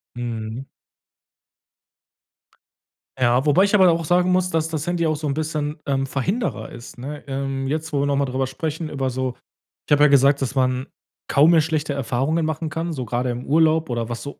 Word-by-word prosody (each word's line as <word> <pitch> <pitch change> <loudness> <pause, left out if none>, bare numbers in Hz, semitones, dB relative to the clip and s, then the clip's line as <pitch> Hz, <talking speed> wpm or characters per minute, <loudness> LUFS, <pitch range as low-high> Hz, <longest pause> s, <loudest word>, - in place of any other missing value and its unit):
Mhm. 115 +1 -5 2.5
Ja, 125 +2 +3
wobei 155 +6 +5
ich 200 - +2
aber 190 -2 +6
da 175 - +6
auch 165 0 -1
sagen 180 +3 +3
muss, 180 0 +2
dass 160 -1 0
das 160 +1 -4
Handy 175 -1 0
auch 155 -1 +1
so 150 0 -4
'n 140 - 0
bisschen, 155 -1 -2
ähm, 135 -1 0
Verhinderer 185 - -2
ist, 120 +1 -11
ne? 145 +4 -7
Ähm, 135 0 -3
jetzt, 155 +2 -3
wo 140 - +1
wir - - +1
noch 140 - +1
mal 140 0 +1
drüber 130 0 -1
sprechen, 155 +4 -4
über 135 -3 -2
so 130 0 -2 0.5
ich - - -11
habe 145 0 +5
ja - - +8
gesagt, 140 0 +4
dass 135 +1 -2
man 130 0 +1 0.4
kaum 150 +4 +5
mehr 165 - +6
schlechte 155 -1 -1
Erfahrungen 140 +5 0
machen 155 +1 -2
kann, 165 +2 -3
so 130 -4 -4
grade 120 +3 -1
im 120 +1 -6
Urlaub 160 +1 +3
oder 120 -2 -2
was 120 - -5
so 140 - -8
145 Hz, 205 wpm, -22 LUFS, 130-160 Hz, 2.5 s, ja